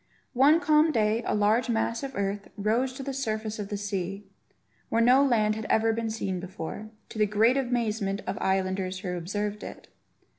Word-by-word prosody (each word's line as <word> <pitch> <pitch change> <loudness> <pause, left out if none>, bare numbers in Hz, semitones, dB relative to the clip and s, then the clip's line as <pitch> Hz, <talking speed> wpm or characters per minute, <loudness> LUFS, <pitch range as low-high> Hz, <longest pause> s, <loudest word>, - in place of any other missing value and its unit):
One 280 +6 +5
calm 305 +1 +4
day 220 -3 +1
a - - +1
large 215 +4 +2
mass 230 0 0
of 275 -1 -6
earth 200 0 -2
rose 225 +6 +1
to 270 - -7
the 275 0 -4
surface 220 -4 -3
of 200 -1 -5
the 205 - -3
sea, 195 -1 -4 0.6
where 225 - +1
no 250 +4 +6
land 220 -6 +3
had 220 0 -5
ever 225 0 +3
been 225 0 -2
seen 195 -4 -3
before, 185 +3 -7 0.2
to 215 - -7
the 210 - +4
great 220 +5 +3
amazement 225 -6 -1
of - - -2
islanders 190 -1 -1
who 180 -3 -3
observed 205 +4 -3
it. - - -9
215 Hz, 185 wpm, -27 LUFS, 200-240 Hz, 0.6 s, no